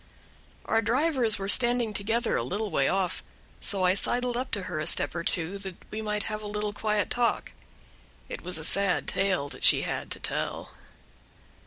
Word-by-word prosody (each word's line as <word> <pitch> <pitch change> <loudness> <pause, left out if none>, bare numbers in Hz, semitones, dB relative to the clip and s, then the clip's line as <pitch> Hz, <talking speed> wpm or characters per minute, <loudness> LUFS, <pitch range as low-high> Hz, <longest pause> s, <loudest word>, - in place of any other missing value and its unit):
Our 225 - +2
drivers 250 -1 +2
were 195 - -4
standing 240 0 +3
together 225 +3 0
a - - 0
little 205 +2 -3
way 135 - +2
off, 190 -2 -1 0.4
so 195 -2 0
I 180 0 +4
sidled 245 +4 0
up 255 +2 -2
to 200 - -1
her 155 - -4
a 155 - -2
step 145 - +3
or 170 0 -4
two, 175 +4 0
that 190 -2 -6 0.2
we 215 - -4
might 210 -1 -2
have 215 -1 -3
a 210 - -6
little 210 0 -3
quiet 210 -1 -1
talk. 240 -1 0 0.8
It - - -7
was 180 -1 -3
a 160 - -7
sad 195 +3 +3
tale 190 -7 0
that - - -11
she - - +6
had - - -4
to - - -6
tell. - - -3
210 Hz, 190 wpm, -27 LUFS, 185-225 Hz, 0.8 s, she